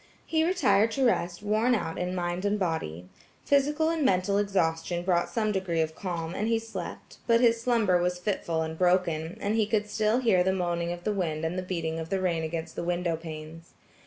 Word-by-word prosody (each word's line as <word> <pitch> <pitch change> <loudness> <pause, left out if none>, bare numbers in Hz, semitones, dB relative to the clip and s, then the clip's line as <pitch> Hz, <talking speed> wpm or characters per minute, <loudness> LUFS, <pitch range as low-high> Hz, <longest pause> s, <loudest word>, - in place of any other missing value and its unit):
He 320 -1 +1
retired 255 - +3
to 270 +1 +1
rest 175 -5 0
worn 220 +4 +2
out 165 -7 -3
in 180 +1 -2
mind 175 0 -2
and 205 +1 +1
body. 160 - -3 0.4
Physical 295 +3 +2
and 325 -2 -1
mental 200 -3 +2
exhaustion 175 -3 0
brought 175 -1 +1
some 215 -2 0
degree 190 -4 -1
of 160 0 0
calm, 170 -2 -4
and 210 - -1
he 230 0 +2
slept, 220 -6 -7
but 230 -1 +5
his 230 -1 +3
slumber 225 -7 +2
was 180 0 0
fitful 175 -3 -1
and 160 0 -4
broken, 175 -3 +1
and 205 +1 -1
he 220 -2 +2
could 210 -1 0
still 215 +2 +1
hear 205 -8 +3
the 190 +1 +1
moaning 175 -2 -1
of 175 0 -6
the 210 - 0
wind 165 -5 -2
and 165 +2 -2
the 185 - -1
beating 165 -3 -3
of 160 0 -6
the 195 0 0
rain 175 -3 0
against 160 0 -4
the - - -3
window 175 -1 0
panes. 160 0 -9
180 Hz, 210 wpm, -28 LUFS, 170-215 Hz, 0.4 s, but